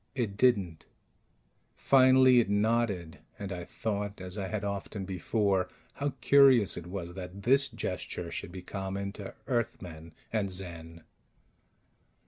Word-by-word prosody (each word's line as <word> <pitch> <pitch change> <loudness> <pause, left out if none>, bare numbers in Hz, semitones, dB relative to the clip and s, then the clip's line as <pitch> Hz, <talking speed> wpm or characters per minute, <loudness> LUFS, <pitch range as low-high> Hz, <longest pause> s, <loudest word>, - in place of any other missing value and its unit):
It 115 -7 -2
didn't. 100 -9 +1 0.9
Finally 130 -1 +6
it 115 - +1
nodded, 105 -5 0 0.2
and 100 -1 -6
I 90 -1 -4
thought, 105 -2 -4
as 90 0 -7
I 100 -2 -3
had 105 +1 -3
often 100 0 -4
before, 95 0 0 0.2
how 145 -1 -2
curious 135 -7 +6
it 85 - -7
was 90 -2 -6
that 95 +1 -8
this 135 +3 +3
gesture 85 -1 -4
should - - -5
be 95 -1 -8
common 100 +1 -4
to 100 -1 -9
Earthmen 90 - -3 0.2
and 105 -3 0
Zen. 85 -3 -6
100 Hz, 130 wpm, -30 LUFS, 90-115 Hz, 0.9 s, Finally